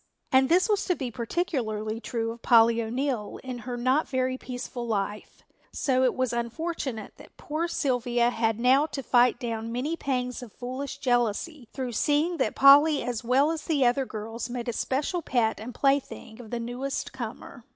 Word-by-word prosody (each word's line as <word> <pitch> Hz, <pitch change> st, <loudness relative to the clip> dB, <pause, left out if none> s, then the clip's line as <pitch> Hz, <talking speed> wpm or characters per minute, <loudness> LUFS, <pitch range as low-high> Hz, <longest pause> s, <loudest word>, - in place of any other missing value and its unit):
And 265 Hz, 0 st, +4 dB
this 360 Hz, +2 st, +4 dB
was 420 Hz, -2 st, +1 dB
to 360 Hz, -, +1 dB
be 260 Hz, -6 st, -4 dB
particularly 225 Hz, -, -2 dB
true 230 Hz, -1 st, -3 dB
of 230 Hz, +1 st, -10 dB
Polly 230 Hz, 0 st, +5 dB
O'Neill 240 Hz, -1 st, -2 dB
in 255 Hz, -2 st, -5 dB
her 245 Hz, 0 st, -5 dB
not 260 Hz, +5 st, +2 dB
very 255 Hz, -1 st, 0 dB
peaceful 245 Hz, -1 st, -6 dB
life, 210 Hz, -1 st, -3 dB, 0.3 s
so 260 Hz, -2 st, +1 dB
it 255 Hz, -, +2 dB
was 255 Hz, -2 st, 0 dB
unfortunate 235 Hz, 0 st, -4 dB
that -, -, -16 dB
poor 315 Hz, +3 st, -2 dB
Sylvia 245 Hz, -6 st, +1 dB
had 225 Hz, -1 st, 0 dB
now 265 Hz, +5 st, +4 dB
to 275 Hz, -3 st, -5 dB
fight 245 Hz, 0 st, +4 dB
down 230 Hz, -2 st, -4 dB
many 265 Hz, +7 st, -2 dB
pangs 250 Hz, -5 st, -2 dB
of 240 Hz, -4 st, -10 dB
foolish 260 Hz, +2 st, -5 dB
jealousy 245 Hz, +2 st, 0 dB
through 255 Hz, -3 st, -4 dB
seeing 300 Hz, +8 st, +1 dB
that -, -, 0 dB
Polly 285 Hz, +2 st, +7 dB
as 240 Hz, -2 st, -3 dB
well 265 Hz, +6 st, +3 dB
as 320 Hz, -1 st, -5 dB
the 290 Hz, -5 st, +2 dB
other 250 Hz, +2 st, +2 dB
girls 225 Hz, +2 st, -6 dB
made 240 Hz, 0 st, -4 dB
a 240 Hz, -, -1 dB
special 285 Hz, -, -1 dB
pet 230 Hz, -8 st, 0 dB
and 225 Hz, +4 st, -6 dB
plaything 275 Hz, -4 st, -1 dB
of 225 Hz, -, -12 dB
the 240 Hz, -, -3 dB
newest 245 Hz, +5 st, -4 dB
comer. 235 Hz, -1 st, -7 dB
250 Hz, 180 wpm, -27 LUFS, 235-275 Hz, 0.3 s, Polly